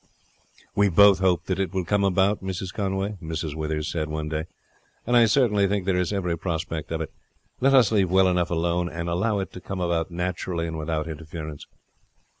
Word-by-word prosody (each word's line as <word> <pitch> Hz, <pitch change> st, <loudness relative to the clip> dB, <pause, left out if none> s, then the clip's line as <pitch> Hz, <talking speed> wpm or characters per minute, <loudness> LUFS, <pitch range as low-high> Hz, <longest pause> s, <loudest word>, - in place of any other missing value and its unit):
"We 100 Hz, 0 st, +3 dB
both 100 Hz, +2 st, +6 dB
hope 90 Hz, -2 st, +2 dB
that 95 Hz, 0 st, -2 dB
it 95 Hz, -2 st, -2 dB
will 95 Hz, -2 st, 0 dB
come 100 Hz, +3 st, +1 dB
about, 95 Hz, +1 st, +2 dB
Mrs. 95 Hz, -1 st, -4 dB
Conway," 100 Hz, 0 st, -2 dB
Mrs. 80 Hz, -2 st, -4 dB
Withers 75 Hz, 0 st, -3 dB
said 80 Hz, -3 st, -2 dB
one 75 Hz, 0 st, -3 dB
day; 80 Hz, 0 st, -2 dB, 0.6 s
"and 120 Hz, -, +1 dB
I 120 Hz, -1 st, +7 dB
certainly 105 Hz, -4 st, +3 dB
think 100 Hz, -1 st, -1 dB
there 95 Hz, -1 st, +1 dB
is 90 Hz, 0 st, 0 dB
every 90 Hz, -4 st, -1 dB
prospect 80 Hz, -2 st, -4 dB
of 80 Hz, 0 st, -2 dB
it. 80 Hz, -, -6 dB, 0.5 s
Let 135 Hz, +1 st, +4 dB
us 120 Hz, -6 st, +5 dB
leave 100 Hz, -4 st, +2 dB
well 95 Hz, +1 st, +4 dB
alone, 85 Hz, -1 st, 0 dB
and 85 Hz, +1 st, -5 dB
allow 100 Hz, +5 st, 0 dB
it 95 Hz, -, -4 dB
to 90 Hz, -, -9 dB
come 95 Hz, +1 st, -5 dB
about 85 Hz, -2 st, 0 dB
naturally 90 Hz, -1 st, -3 dB
and 80 Hz, -1 st, -4 dB
without 80 Hz, 0 st, -2 dB
interference." 80 Hz, -1 st, -7 dB
90 Hz, 195 wpm, -25 LUFS, 80-95 Hz, 0.6 s, I